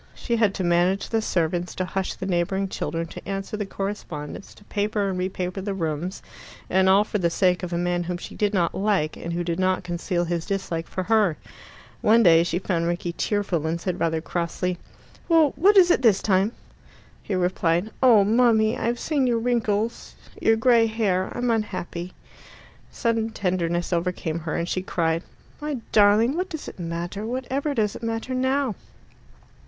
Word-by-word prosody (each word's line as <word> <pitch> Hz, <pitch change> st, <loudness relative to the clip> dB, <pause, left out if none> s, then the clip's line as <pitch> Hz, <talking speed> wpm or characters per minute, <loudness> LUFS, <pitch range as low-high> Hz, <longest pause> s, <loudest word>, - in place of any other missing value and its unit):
She 235 Hz, -, -2 dB
had 215 Hz, -3 st, +2 dB
to 190 Hz, -, -2 dB
manage 175 Hz, +3 st, +2 dB
the 225 Hz, -1 st, +1 dB
servants, 175 Hz, -3 st, -1 dB
to 185 Hz, -, -1 dB
hush 190 Hz, +1 st, -3 dB
the -, -, -6 dB
neighbouring 190 Hz, +2 st, 0 dB
children, 165 Hz, -2 st, -3 dB
to -, -, -10 dB
answer 195 Hz, +2 st, -3 dB
the 210 Hz, -2 st, -3 dB
correspondence, 195 Hz, -6 st, -6 dB
to -, -, -18 dB
paper 205 Hz, 0 st, -1 dB
and 185 Hz, -1 st, -2 dB
re 185 Hz, +1 st, 0 dB
paper 185 Hz, 0 st, -4 dB
the 200 Hz, 0 st, -3 dB
rooms 165 Hz, +1 st, -3 dB, 0.5 s
and 190 Hz, +1 st, +4 dB
all 195 Hz, +2 st, +6 dB
for 210 Hz, 0 st, -3 dB
the 170 Hz, -2 st, +2 dB
sake 180 Hz, +1 st, +2 dB
of 180 Hz, -1 st, -5 dB
a 170 Hz, -, -1 dB
man 175 Hz, 0 st, 0 dB
whom 180 Hz, 0 st, -3 dB
she -, -, -9 dB
did 210 Hz, -1 st, 0 dB
not 180 Hz, -5 st, +1 dB
like, 195 Hz, -6 st, 0 dB
and 170 Hz, -, -5 dB
who 175 Hz, +1 st, -1 dB
did 170 Hz, 0 st, -2 dB
not 185 Hz, 0 st, +1 dB
conceal 175 Hz, 0 st, -2 dB
his 170 Hz, -1 st, -3 dB
dislike 190 Hz, -5 st, -3 dB
for 185 Hz, -, -3 dB
her. 210 Hz, -6 st, +2 dB, 0.6 s
One 230 Hz, +2 st, +5 dB
day 165 Hz, -3 st, +7 dB
she 170 Hz, 0 st, -1 dB
found 170 Hz, -3 st, -1 dB
Rickie 175 Hz, 0 st, -2 dB
tearful, 180 Hz, -4 st, -1 dB
and 165 Hz, +1 st, -1 dB
said 180 Hz, +1 st, -3 dB
rather 160 Hz, -1 st, 0 dB
crossly, 175 Hz, +2 st, -2 dB, 0.5 s
"Well, 320 Hz, -4 st, +5 dB
what 405 Hz, +4 st, +5 dB
is 355 Hz, -2 st, +7 dB
it 345 Hz, -, +3 dB
this 215 Hz, -6 st, +4 dB
time?" 195 Hz, +2 st, +2 dB, 0.7 s
He 200 Hz, -, -3 dB
replied, 180 Hz, +1 st, +1 dB
"Oh, 235 Hz, -6 st, +7 dB
mummy, 220 Hz, +1 st, +3 dB
I've 240 Hz, 0 st, -1 dB
seen 285 Hz, -5 st, +1 dB
your 235 Hz, -1 st, +2 dB
wrinkles 230 Hz, -1 st, -1 dB, 0.3 s
your 225 Hz, -, +4 dB
grey 230 Hz, 0 st, +4 dB
hair 205 Hz, -4 st, 0 dB
I'm 245 Hz, -1 st, +1 dB
unhappy." 185 Hz, -5 st, -3 dB, 0.8 s
Sudden 230 Hz, -1 st, -1 dB
tenderness 175 Hz, -4 st, -1 dB
overcame 170 Hz, -2 st, -1 dB
her, 160 Hz, -1 st, -4 dB
and 170 Hz, 0 st, -1 dB
she 185 Hz, -, -1 dB
cried, 165 Hz, -3 st, 0 dB, 0.4 s
"My 295 Hz, -2 st, -3 dB
darling, 215 Hz, +5 st, +5 dB
what 365 Hz, +2 st, -2 dB
does 315 Hz, -4 st, -6 dB
it -, -, -9 dB
matter? 170 Hz, +4 st, -4 dB
Whatever 260 Hz, +5 st, -2 dB
does 210 Hz, -4 st, 0 dB
it -, -, -8 dB
matter 230 Hz, +2 st, -3 dB
now?" 260 Hz, -1 st, +1 dB
195 Hz, 185 wpm, -24 LUFS, 175-225 Hz, 0.8 s, day